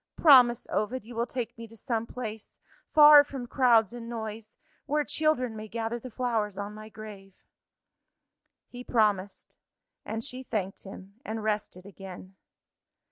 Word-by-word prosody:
_ - - -63
Promise, 250 -6 +7
Ovid, 220 +3 -2
you 240 - -10
will 235 +1 -1
take 245 -1 -5
me 230 - -8
to 225 +1 -16
some 230 0 -3
place, 220 -4 -8 0.3
far 295 -1 +9
from 270 -3 -7
crowds 235 -4 +3
and 235 -1 -8
noise 220 -2 -7 0.3
where 300 +1 +1
children 290 -7 0
may 215 0 -7
gather 230 +2 -3
the 255 - -9
flowers 225 -5 -2
on 205 +1 -5
my 215 0 -10
grave." 205 -3 -11 1.3
He 245 0 -10
promised 205 -5 -1 0.4
and 225 +1 -5
she 255 -1 -5
thanked 205 -7 -4
him, 195 +2 -12
and 220 0 -5
rested 210 -4 -3
again. 190 -1 -11
225 Hz, 150 wpm, -28 LUFS, 210-245 Hz, 1.3 s, far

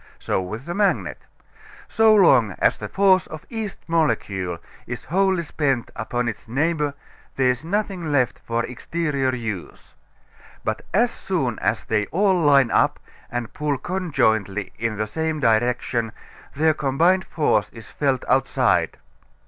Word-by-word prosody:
So - - -1
with 110 +8 -6
the 170 - -4
magnet. 155 - 0 0.7
So 220 0 +4
long 130 - +5
as - - +3
the - - -7
force 190 -2 +3
of 155 -1 -9
each 220 -4 -4
molecule 100 - 0 0.3
is 120 0 -5
wholly 190 0 +1
spent 140 -6 -1
upon 120 +2 -2
its 115 - -5
neighbor 145 +3 0 0.4
there 130 -1 +3
is 125 +3 -5
nothing 185 -3 -2
left 130 -4 +1
for 115 0 -2
exterior 140 -1 -2
use. 110 -7 -6 0.7
But - - -2
as 235 +4 +3
soon 135 -12 -2
as 105 +3 0
they 105 -2 0
all 195 +2 +2
line 145 -7 +4
up - - +2 0.3
and 120 -2 -4
pull 150 -2 -1
conjointly 120 - -1
in 115 -2 -2
the 110 - -1
same 160 +7 -2
direction 115 -1 +1 0.4
their 155 +2 +3
combined 165 +7 +2
force 125 -9 +1
is 115 -2 -12
felt 135 0 -1
outside. 135 +1 +2
135 Hz, 140 wpm, -23 LUFS, 115-170 Hz, 0.7 s, long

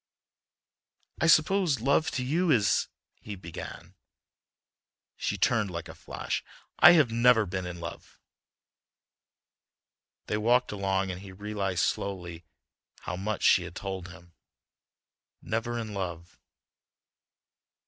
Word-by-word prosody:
"I 160 - +2
suppose 165 - +4
love 140 +6 +2
to 130 - -1
you 170 +7 +1
is—" 105 -8 +3 0.3
he 105 - -7
began. 85 -3 -9 1.2
She - - -2
turned 110 -4 +2
like 85 -2 -6
a 80 - -9
flash. - - -4 0.4
"I 175 - +10
have 150 -9 +4
never 115 -1 +4
been 95 -1 -4
in 90 -1 -7
love." 85 -1 -9 2.1
They 105 - -1
walked 120 +4 +2
along, 95 -1 -1
and 90 +1 -7
he 100 -1 -10
realized 100 -2 -2
slowly 90 -4 -3 0.6
how 85 - -4
much 100 +3 -3
she 95 - +6
had 90 0 -8
told 95 -2 -5
him... 90 -2 -15 1.1
never 115 +2 -3
in 110 -2 -5
love.... 85 -3 -6
100 Hz, 115 wpm, -28 LUFS, 90-120 Hz, 2.1 s, I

